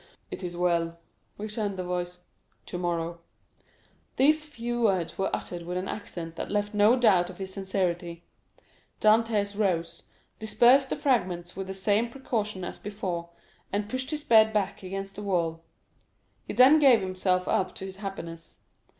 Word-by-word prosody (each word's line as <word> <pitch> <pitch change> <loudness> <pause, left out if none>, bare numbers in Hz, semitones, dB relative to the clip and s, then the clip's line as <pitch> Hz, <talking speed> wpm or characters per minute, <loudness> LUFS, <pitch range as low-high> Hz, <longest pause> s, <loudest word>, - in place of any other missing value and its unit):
"It - - -6
is 175 -1 -5
well," 170 -1 +1 0.4
returned 210 -1 -3
the 185 - -2
voice; 180 0 -4 0.4
"tomorrow." 170 -1 -3 1.0
These 300 +3 +4
few 240 -4 -4
words 190 -7 +1
were 195 - 0
uttered 175 -1 -4
with 175 +1 -4
an 185 +1 -3
accent 165 -5 -6
that - - -4
left 205 0 -1
no 210 +3 +5
doubt 195 -8 +4
of 180 - -10
his 190 -1 -6
sincerity; 175 -3 -2 0.8
Dantès 215 -2 +3
rose, 170 -5 0 0.4
dispersed 240 +5 +4
the - - 0
fragments 180 -9 0
with 190 0 -5
the 190 - -5
same 205 +4 +1
precaution 215 -6 -3
as - - -6
before, 185 -5 -4 0.4
and 205 +1 -1
pushed 260 +2 -3
his 300 -1 -3
bed 220 -6 +6
back 210 -3 -1
against 195 +1 -6
the - - -5
wall. 170 -5 -1 0.9
He - - -4
then 270 +5 +7
gave 265 -6 +7
himself 185 -1 0
up 185 - 0
to 190 - -6
his 190 0 -8
happiness. 170 -5 -7
195 Hz, 155 wpm, -27 LUFS, 175-220 Hz, 1.0 s, then